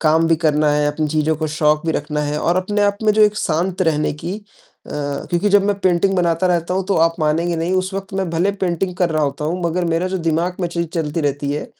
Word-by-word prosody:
काम 160 +1 +3
भी 165 - +4
करना 150 -2 +2
है, 150 0 +2
अपनी 155 +1 -2
चीज़ों 155 +1 0
को 155 +1 -2
शौक 150 0 +1
भी 160 - +1
रखना 150 +1 -2
है 150 0 -2
और 170 +3 +1
अपने 205 +3 0
आप 200 0 +2
में 215 -1 +4
जो 215 +1 +4
एक 210 0 +3
शांत 175 +4 -1
रहने 155 -3 +1
की 170 +6 -5 0.5
अ, - - -12 0.4
क्योंकि 175 +4 +1
जब 205 0 +5
मैं 205 - +2
पेंटिंग 185 +1 +2
बनाता 170 0 +1
रहता 175 0 0
हूँ, 190 0 -1
तो 195 - +1
आप 165 +1 +3
मानेंगे 165 +3 +1
नहीं 165 +3 -1
उस 185 +1 -1
वक़्त 195 0 -5
मैं 190 -2 -1
भले 170 +4 +1
पेंटिंग 185 -1 -2
कर 180 -2 +1
रहा 155 -1 0
होता 145 +1 -2
हूँ, 170 +4 -2
मगर 170 +2 0
मेरा 170 +2 0
जो 190 0 -2
दिमाग 170 +3 0
में 175 - 0
चीज 170 0 -2
चलती 160 -1 -1
रहती 145 -1 -1
है, 150 - -4
170 Hz, 255 wpm, -19 LUFS, 155-185 Hz, 0.5 s, जब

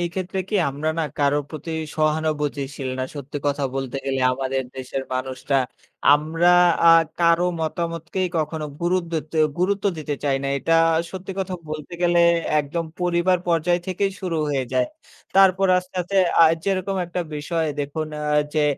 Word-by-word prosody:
এইক্ষেত্রে 180 +2 -3
কি 210 - 0
আমরা 145 +3 -2
না 165 - +1 0.2
কারো 145 +1 +3
প্রতি 160 +1 -6 0.2
সহানুভূতিশীল 150 -3 -1
না 130 - 0
সত্যি 145 0 -6
কথা 145 0 0
বলতে 135 -1 -3
গেলে। 135 -1 -1
আমাদের 135 0 -2
দেশের 130 +1 -4
মানুষরা 130 +1 -1 0.6
আমরা 160 +4 +2 0.4
আ - - +10 0.3
কারো 170 +1 +4
মতামতকেই 170 +3 -2
কখনো 155 0 -2
গুরুদেত্তে 170 -3 -1 0.2
গুরুত্ব 195 +3 0
দিতে 150 -1 -3
চাই 140 -2 +2
না। 140 - -1
এটা 165 +5 +2 0.3
সত্যি 190 0 -6
কথা 190 -1 -2 0.2
বলতে 155 +2 -6
গেলে 175 0 +4 0.4
একদম 160 +4 -3 0.2
পরিবার 180 +1 +2
পর্যায় 175 +1 +2
থেকেই 195 +1 -1
শুরু 180 -4 -2
হয়ে 135 -2 0
যায়। 125 -1 +2 0.5
তারপর 195 0 +5
আস্তে, 180 +1 -9
আস্তে 195 +3 0 0.2
আ - - +9 0.2
যেরকম 195 0 -1
একটা 180 +1 -3
বিষয় 160 +2 -1
দেখুন 145 +2 -3 0.2
আ - - -3 0.3
যে 155 -1 +3
160 Hz, 150 wpm, -23 LUFS, 145-180 Hz, 0.6 s, আ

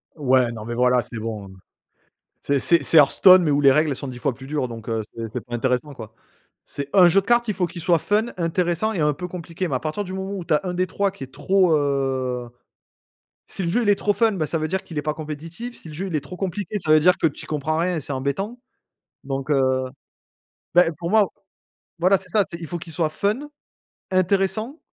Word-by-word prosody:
ouais, 130 -5 +2
non, 110 -2 -8
mais 120 - -4
voilà, 125 0 +3
c'est 120 - -8
bon. 105 -4 -6 0.9
C'est 140 -1 +1
c'est 170 +5 +3
c'est 165 - +4
Heartstone, 180 +5 +7
mais 150 - +1
où 145 - +2
les 140 -1 +7
règles 150 -1 +2
sont 140 - -6
10 125 -1 -7
fois 130 +2 0
plus 135 +2 -12
dures. 145 -3 -1
Donc 115 -1 -8
heu, 110 -1 -1
c'est 115 -1 -5
c'est 125 - -4
pas 120 -1 -6
intéressant, 130 +4 -1
quoi. 110 -3 -10 0.5
C'est 140 0 -6
un 180 -2 +8
jeu 195 - +4
de - - -19
cartes, 240 0 +3
il - - +1
faut 180 -2 0
qu'il 170 0 -8
soit 170 -1 +3
fun, 215 +6 +1
intéressant 175 +5 0
et 170 - -2
un 150 0 +2
peu 180 +5 -6
compliqué. 175 +1 -5
Mais 140 - -2
à 125 - 0
partir 160 +7 -3
du 185 0 -7
moment 190 +1 -4
où 175 - -6
tu - - +1
as 150 - +3
un 180 -1 -3
des 185 +1 0
3 200 -1 0
qui 185 -8 -10
est 130 - -23
trop, 185 -4 +3
heu, 130 -3 -1 1.0
si 195 - -1
le 170 - -1
jeu 240 +6 +1
il 210 - -1
est 200 - +4
trop 205 - +1
fun, 225 -1 +3
bah 160 -6 -2
ça 165 - -1
veut 155 0 -2
dire 190 +1 -2
qu'il 160 -3 -6
est - - -1
pas 150 -1 -2
compétitif, 165 +10 -7
si 160 - -9
le 155 - -9
jeu 190 +6 -4
il 175 - -6
est - - 0
trop 165 +6 -9
compliqué, 195 +2 -3
ça 155 -5 +1
veut 155 - +6
dire 180 +4 +5
que - - +2
tu 145 - -4
y - - -11
comprends 155 +1 -1
rien, 175 +1 0
et - - -2
c'est 140 - -5
embêtant. 170 - -3 0.6
Donc 135 +1 -4
heu, 130 -1 +2 0.9
ben 175 -1 +5
pour 170 +1 -4
moi 215 -2 +5 0.7
voilà 185 +3 +4
c'est 185 - -11
ça, 205 +2 +3
c'est 170 - -8
il 165 - -6
faut 175 - -4
qu'il 165 0 -10
soit 155 0 0
fun, 215 - -2 0.6
intéressant 195 - 0
160 Hz, 250 wpm, -23 LUFS, 135-185 Hz, 1.0 s, un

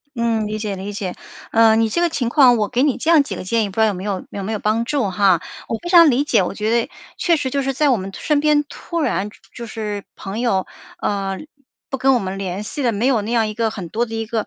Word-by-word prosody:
嗯， 230 -2 0
理 215 +1 -3
解 210 -2 -3
理 195 +2 -6
解。 195 -3 -4 0.4
呃， 225 -1 +5
你 225 0 +3
这 340 - -1
个 345 - +3
情 250 -7 -1
况， 250 -3 +6
我 210 -2 +1
给 250 +1 +1
你 285 -3 +2
这 330 - +1
样 315 - +7
几 195 - -6
个 - - -6
建 225 +4 +1
议， 205 - -2
不 190 - -13
知 - - -2
道 - - +6
有 205 - 0
没 185 - -6
有 195 -2 -3
有 200 - -5
没 220 - -3
有 215 - -2
帮 215 +3 +1
助 265 -4 0
哈。 185 -2 +3 0.3
我 225 - -2
非 345 - -6
常 340 -3 +8
理 270 +2 +2
解， 295 - +3
我 180 - -2
觉 215 +2 -1
得， - - -7 0.3
确 340 -2 +2
实 270 -3 -2
就 280 +1 0
是 270 0 -1
在 295 +2 +2
我 250 - +3
们 195 0 -6
突 - - -10
身 300 -2 +2
边， 300 0 +3
突 340 -1 -5
然 205 -8 0
就 - - -18 0.2
就 235 - -7
是 210 -2 -4
朋 195 +3 -6
友， 230 -6 +1 0.3
呃， 195 -2 -2 0.5
不 270 - -3
跟 265 +1 +3
我 250 - +3
们 190 -1 -4
联 195 +1 -4
系 280 +7 -5
的， 240 - +2
没 220 +3 -1
有 250 -5 +2
那 215 +3 -5
样 225 -2 +2
一 215 - -4
个 225 +1 0
很 190 -5 -6
多 235 +6 0
的 225 - -7
一 225 - -2
个 220 -1 -2
225 Hz, 315 characters per minute, -20 LUFS, 200-260 Hz, 0.5 s, 常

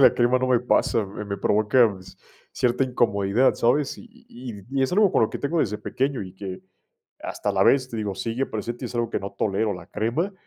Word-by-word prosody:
de 135 - +9
la - - -7
crema 120 +1 +3
no 130 - 0
me 125 -2 +3
pasa, 115 -2 +2
me 100 +2 -7
me 100 0 -3
provoca 110 +2 +3
ci 95 - -14 0.4
cierta 125 +2 +1
incomodidad, 115 -1 +2
¿sabes? 135 +4 +1
Y - - -12
y 220 - -10
y 100 - -11
y 135 0 +1
es 130 - +1
algo 200 0 +4
con - - +3
lo 110 - +3
que - - -4
tengo 160 +4 -1
desde 105 -5 0
pequeño 135 +2 -2
y 95 -1 -10
que 95 -1 -7 0.6
hasta - - -3
la - - +2
vez, 130 -2 +4
te 115 - -5
digo, 105 -2 -2
sigue 115 +7 -2
presente 120 +3 -5
y - - -1
es 120 - -9
algo 120 -1 -1
que - - -2
no 100 0 -6
tolero 100 +1 0
la 90 -2 -10
crema, 120 - -1
120 Hz, 240 wpm, -24 LUFS, 100-130 Hz, 0.6 s, de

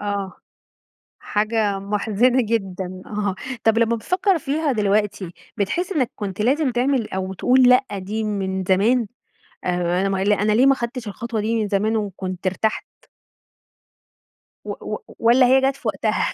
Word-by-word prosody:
آه. 200 -2 -3 0.9
حاجة 210 -1 0
محزنة 210 +5 +1
جدًا، 190 -5 -3
آه، 205 -2 -2 0.3
طب 225 0 +3
لمّا 230 0 +3
بتفكر 365 - +1
فيها 300 0 -1
دلوقتي، 205 -4 0 0.2
بتحس 335 - -1
إنّك 275 -10 0
كنت 200 -1 -4
لازم 270 +4 +2
تعمل 245 -2 0
أو 190 0 -3
تقول 255 +7 +3
لأ، 250 +2 +5
دي 215 +4 -3
من 190 -2 -2
زمان 215 +6 +2 0.6
آآ، 180 0 0
أنا 195 - 0
ما 195 -1 -1
أنا 205 +1 +2
ليه 245 +4 +4
ما 275 - +6
أخدتش 235 -1 -5
الخطوة 220 +2 -4
دي 220 +2 -1
من 210 - -2
زمان 210 +2 0
وكنت 190 -3 -4
ارتحت؟ 210 +4 -1 1.8
و - - -7
و - - -4 0.2
والّا 240 +3 +5
هي 265 +1 +5
جت 270 0 +1
في - - -7
وقتها؟ - - 0
215 Hz, 150 wpm, -22 LUFS, 195-245 Hz, 1.8 s, ما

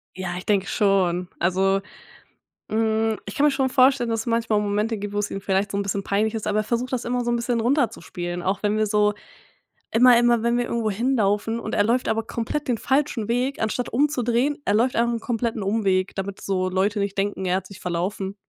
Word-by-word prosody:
Ja, 180 -1 -4
ich 180 - -8
denke 200 -2 +2
schon. 185 -4 +1
Also, 190 +2 +2 0.9
hm, 220 0 +1
ich 200 - -6
kann 285 - +2
mir 300 - +6
schon 270 -1 +1
vorstellen, 260 -1 +4
dass 225 -1 0
es 225 - -7
manchmal 230 -2 +1
Momente 210 +2 -1
gibt, 205 0 -5
wo 205 - -2
es 205 0 -1
ihm 195 - -4
vielleicht 195 +1 0
so 200 - -3
'n 200 - 0
bisschen 200 0 -2
peinlich 210 +3 0
ist, 220 - -4
aber 210 0 +1
er - - -3
versucht 240 +4 -2
das 250 -2 -1
immer 245 +1 -1
so 240 - 0
'n 240 - +2
bisschen 235 0 -1
runterzuspielen, 220 - -1
auch 190 +2 -1
wenn 210 0 +1
wir 215 0 +1
so 210 0 +2 0.8
immer 245 +1 +6
immer 240 -1 +3
wenn 235 +1 +1
wir 245 0 0
irgendwo 230 -2 -1
hinlaufen 225 -1 0
und - - -4
er 205 - +3
läuft 240 +4 +1
aber 225 0 +1
komplett 235 +6 -3
den 240 -3 +1
falschen 265 -5 0
Weg, 250 +4 -1
anstatt 220 +2 -1
umzudrehen, 260 0 +1
er 205 - +2
läuft 240 +4 +2
einfach 235 +1 +2
'n 230 - -3
kompletten 230 -2 -2
Umweg, 195 -2 0
damit 195 0 -5
so 185 -1 0
Leute 195 +3 0
nicht 200 0 -2
denken, 195 -1 -1
er 180 0 +2
hat 190 0 -4
sich 195 -1 -12
verlaufen. 190 +3 -3
215 Hz, 225 wpm, -23 LUFS, 195-235 Hz, 0.9 s, mir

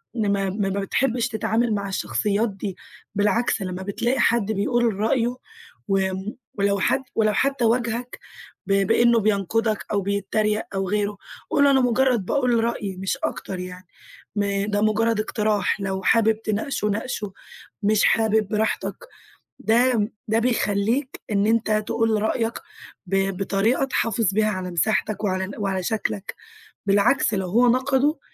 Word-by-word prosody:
إن 210 -3 +1
ما 195 -1 0
ما 195 0 -1
ما 195 +1 -2
بتحبش 240 +4 0
تتعامل 225 0 0
مع 200 -1 -3
الشخصيات 210 +3 0
دي، 195 -1 -6 0.4
بالعكس 210 +2 +1
لمّا 185 0 -4
بتلاقي 235 +7 -1
حد 230 -3 +2
بيقول 230 +2 +1
رأيُه 235 +4 0 0.5
و 195 0 +3 0.6
ولو 200 0 +1
حد 265 +7 +1
ولو 215 -1 +2
حتى 275 +1 +1
واجهك 235 +1 -1 0.5
ب 195 - +2
بإنه 235 -1 +4
بينقدك 215 +1 0
أو 205 -1 +1
بيتريّق 205 +2 0
أو 195 -1 -1
غيرُه، 205 0 -1 0.3
قُل 285 - +4
له 280 - +5
أنا 265 -1 +4
مجرّد 245 -3 +2
باقول 245 0 +1
رأيي 200 -5 -3
مش 190 +1 -2
أكتر 185 -1 -3
يعني، 180 0 -8 0.5
م 200 -1 0
ده 205 0 +1
مجرد 220 +1 +2
اقتراح، 210 -2 0
لو 190 0 -2
حابب 220 0 +3
تناقشُه 215 +1 -1
ناقشُه، 210 -1 -3 0.5
مش 210 +1 +3
حابب 220 -2 +3
براحتك، 220 +1 -1 0.6
ده 230 -1 +2 0.2
ده 220 +1 +2
بيخليك 230 +2 0
إن 200 0 +2
أنت 225 0 +1 0.2
تقول 225 -2 +1
رأيك 225 +1 0 0.5
ب 195 0 0
بطريقة 200 +7 +1
تحافظ 230 -5 0
بيها 215 0 +3
على 185 -3 -4
مساحتك 215 +3 0
وعلى 190 0 -1
وعلى 195 -3 -1
شكلك، 205 -1 -3 0.5
بالعكس 205 +3 +3
لو 190 -2 -1
هو 240 +6 +4
نقدُه، 265 +4 +2
215 Hz, 145 wpm, -23 LUFS, 200-235 Hz, 0.6 s, له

